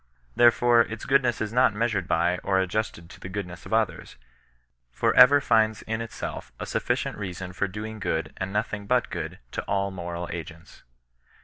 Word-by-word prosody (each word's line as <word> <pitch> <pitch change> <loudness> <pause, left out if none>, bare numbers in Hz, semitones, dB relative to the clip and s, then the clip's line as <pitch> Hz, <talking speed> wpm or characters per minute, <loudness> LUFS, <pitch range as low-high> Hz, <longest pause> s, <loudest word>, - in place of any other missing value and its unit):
Therefore 120 0 +5
its 110 -1 -3
goodness 135 -3 +2
is 110 0 -3
not 125 -4 +4
measured 105 -5 0
by 90 +2 +1
or 95 -1 +1
ad 95 -1 0
justed 105 -5 -3
to - - -14
the 90 - -8
goodness 90 -3 -6
of - - -12
others, 110 -1 -1 0.8
but - - +2
ever 140 +3 +8
finds 110 -5 +2
in 110 +1 -3
itself 115 - -6
a - - -4
8ufi[icient - - -1
reason 90 -2 -6
for 100 - -1
doing 105 +3 -7
good 80 -5 -2
and 95 0 -4
nothing 105 -1 -2
but 125 +2 +1
good - - -5
to - - -3
all 100 -1 0
moral 85 -1 -5
agents. 85 +1 -9
105 Hz, 180 wpm, -26 LUFS, 90-115 Hz, 0.8 s, ever